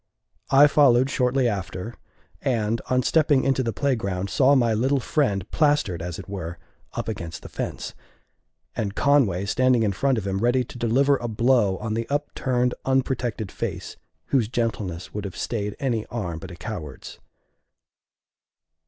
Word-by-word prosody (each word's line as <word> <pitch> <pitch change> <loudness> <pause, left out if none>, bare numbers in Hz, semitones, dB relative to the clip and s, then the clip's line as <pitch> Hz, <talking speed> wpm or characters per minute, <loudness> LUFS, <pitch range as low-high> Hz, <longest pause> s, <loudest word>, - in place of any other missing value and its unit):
I 140 +2 +7
followed 135 -3 +4
shortly 125 0 +2
after, 95 +1 -4 0.5
and, 115 -4 0
on 125 0 +2
stepping 150 -3 +3
into 135 -1 +2
the 115 -2 -1
playground, 100 -9 -1
saw 140 +1 +4
my 120 -4 +3
little 130 +6 +2
friend 105 - 0
plastered, 145 - +2
as 85 0 -5
it - - -9
were, 90 -4 -5 0.4
up - - -4
against 85 -2 -5
the - - -9
fence, - - -5 0.8
and 105 -3 -2
Conway 120 -10 +3
standing 125 +2 +3
in 105 - +2
front 130 +6 +1
of 105 - -3
him 95 0 -1
ready 120 +3 +2
to 120 - -11
deliver 135 +5 +3
a 120 - -4
blow 115 -3 +2
on 110 +2 -3
the 115 +1 -3
upturned, 130 -4 0
unprotected 125 -5 -1
face, - - -5 0.3
whose 125 -6 +2
gentleness 110 -7 -3
would 105 - -4
have 100 -3 -6
stayed 105 -3 -3
any 120 -5 -1
arm 90 -9 -4
but 95 - -9
a 90 - -9
coward's. 85 - -7
115 Hz, 155 wpm, -24 LUFS, 100-130 Hz, 0.8 s, I